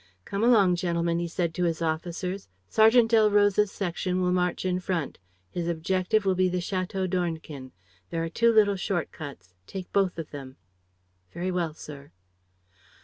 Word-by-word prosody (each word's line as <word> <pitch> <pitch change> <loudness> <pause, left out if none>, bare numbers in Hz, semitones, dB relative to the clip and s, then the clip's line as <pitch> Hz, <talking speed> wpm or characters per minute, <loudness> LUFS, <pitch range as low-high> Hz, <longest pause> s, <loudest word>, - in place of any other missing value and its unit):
"Come 200 +2 -2
along, 205 -7 +5
gentlemen," 170 -1 0
he 170 - -2
said 170 -1 -2
to 180 +2 0
his 165 -2 0
officers. 170 - -3 0.2
"Sergeant 225 +1 +5
Delroze's 210 -2 +4
section 180 -1 -2
will 180 -1 +1
march 180 0 0
in 180 0 +1
front. 175 -5 -3 0.3
His 175 -1 -3
objective 185 +5 0
will 190 - +3
be 185 0 +2
the 180 - -1
Château 185 +1 -2
d'Ornequin. 160 -7 -3 0.4
There 165 0 -2
are 165 - -2
two 230 +7 +3
little 205 -3 +4
short 185 -3 -2
cuts. 125 - -10
Take 185 -2 -7
both 195 -3 +2
of 165 -2 -6
them." 135 -2 -8 0.8
"Very 180 +2 -2
well, 170 -4 -1
sir." 145 -2 -10
180 Hz, 160 wpm, -27 LUFS, 165-195 Hz, 0.8 s, along